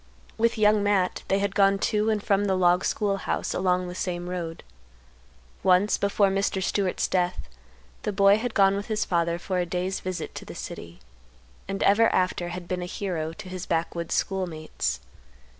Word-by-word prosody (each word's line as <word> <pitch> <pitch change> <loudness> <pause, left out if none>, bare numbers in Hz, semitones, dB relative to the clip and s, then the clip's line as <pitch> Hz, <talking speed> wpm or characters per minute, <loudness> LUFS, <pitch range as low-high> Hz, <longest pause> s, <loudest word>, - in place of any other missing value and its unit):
With 230 +1 +1
Young 210 -1 +4
Matt 200 -3 +1
they 195 - +2
had 200 0 -1
gone 195 -1 +4
to 210 +2 +1
and 215 -2 0
from 205 -1 +2
the 190 -1 +1
log 180 0 +3
school 200 -2 0
house - - -2
along 180 -1 +1
the 180 - -6
same 175 -1 -3
road. 170 -2 -5 1.0
Once, 185 +2 +3
before 200 0 +2
Mr. 195 0 0
Stewart's 195 -1 0
death, 180 - -1 0.5
the - - -2
boy 200 +1 +5
had 245 0 -4
gone 195 -1 +5
with 200 +1 -4
his 215 -2 -1
father 170 -1 0
for 185 +1 -2
a 175 - 0
day's 180 +2 -2
visit 185 -1 -5
to - - -7
the - - -10
city, 85 +1 -8 0.7
and 195 0 -2
ever 225 +3 +5
after 180 -1 0
had 175 0 -7
been 180 0 -2
a - - -3
hero 175 -5 -3
to 185 - -10
his 185 -1 -6
backwoods 170 0 -1
schoolmates. 160 - -2
190 Hz, 180 wpm, -26 LUFS, 180-200 Hz, 1.0 s, boy